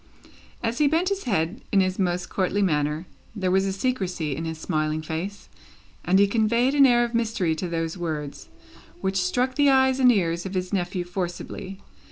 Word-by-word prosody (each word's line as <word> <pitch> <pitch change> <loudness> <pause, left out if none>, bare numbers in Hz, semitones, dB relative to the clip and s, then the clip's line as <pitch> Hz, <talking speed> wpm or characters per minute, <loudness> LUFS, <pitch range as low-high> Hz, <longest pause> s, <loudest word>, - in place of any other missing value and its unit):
As 235 +1 -1
he 300 - +4
bent 330 +5 +2
his 395 0 -3
head 190 -3 -1
in 200 - +4
his 185 0 0
most 180 -1 0
courtly 195 +1 0
manner, 150 -1 0 0.3
there 185 -3 -1
was 190 +1 +3
a - - 0
secrecy 190 - -2
in 165 - -4
his 160 -1 -4
smiling 155 0 -1
face, 170 +6 -5 0.6
and 185 +2 +3
he 200 - +6
conveyed 235 +5 +2
an 280 -2 +6
air 240 -1 +4
of 240 0 -3
mystery 220 -7 0
to 180 - -3
those 165 +1 -3
words, 150 -4 -5 0.5
which 190 -1 0
struck 245 +8 0
the 285 +1 +4
eyes 265 -1 +4
and 250 -1 +6
ears 170 -5 0
of 190 0 -6
his 185 +2 -2
nephew 180 -1 -1
forcibly. 180 +2 -5
190 Hz, 190 wpm, -25 LUFS, 170-235 Hz, 0.6 s, he